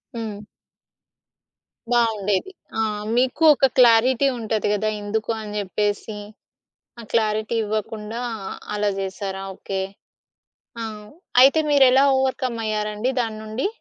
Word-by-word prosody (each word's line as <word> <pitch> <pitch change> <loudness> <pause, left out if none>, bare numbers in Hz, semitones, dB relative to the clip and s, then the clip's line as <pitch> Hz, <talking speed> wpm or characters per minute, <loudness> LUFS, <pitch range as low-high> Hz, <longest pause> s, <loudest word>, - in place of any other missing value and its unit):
హ్మ్. 210 -2 -6 1.5
బావుండేది. 220 - +1 0.3
ఆ! 225 - +1 0.3
మీకు 255 +5 +1
ఒక 270 - +3
క్లారిటీ 250 +2 +5
ఉంటది 220 -1 -1
కదా‍! 215 +1 0
ఎందుకు 220 +2 -3
అని 210 -1 -7
చెప్పేసి, 205 +2 -2 0.8
ఆ - - -8
క్లారిటీ 215 0 +1
ఇవ్వకుండా 215 +2 -4 0.5
అలా 210 0 +1
జేసారా? 195 0 -4
ఓకే. 190 -1 -4 1.0
ఆ! - - -3 0.6
అయితే 275 +4 +5
మీరు 280 -2 +6
ఎలా 270 +2 +5
ఓవర్‌కమ్ 260 -3 -1
అయ్యారండి 215 +3 -1
దాన్నుండి. 220 - -3
220 Hz, 105 wpm, -22 LUFS, 210-240 Hz, 1.5 s, మీరు